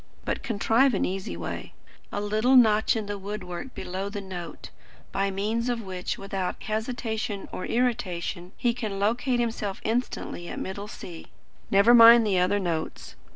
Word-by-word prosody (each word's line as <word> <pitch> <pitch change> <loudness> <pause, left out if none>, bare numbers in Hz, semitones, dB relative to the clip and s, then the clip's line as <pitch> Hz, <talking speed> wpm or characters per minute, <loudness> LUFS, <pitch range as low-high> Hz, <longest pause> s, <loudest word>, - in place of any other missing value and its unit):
But - - -2
contrive 230 +3 +2
an - - +1
easy 190 +1 -4
way - - -6 0.4
a - - -2
little 215 +5 +2
notch 220 -3 +5
in 220 -2 -2
the 205 0 -4
wood 205 +1 -5
work 180 +7 -7
below 190 +2 -4
the 205 0 -5
note 180 -5 -8 0.4
by 195 0 0
means 215 +5 -1
of 240 -1 0
which, 185 -2 -4
without 195 -2 -4
hesitation 220 -2 -3
or 185 - -5
irritation, 195 -7 -1
he 240 -1 +1
can 220 -5 -4
locate 240 +5 +1
himself 225 -4 -2
instantly 225 -6 -2
at - - -6
middle 200 +2 -5
C. 175 -5 -9 0.4
Never 200 +4 +6
mind 230 0 +9
the 195 -3 +2
other 180 +3 +2
notes. 170 -5 -3
205 Hz, 160 wpm, -26 LUFS, 190-230 Hz, 0.4 s, mind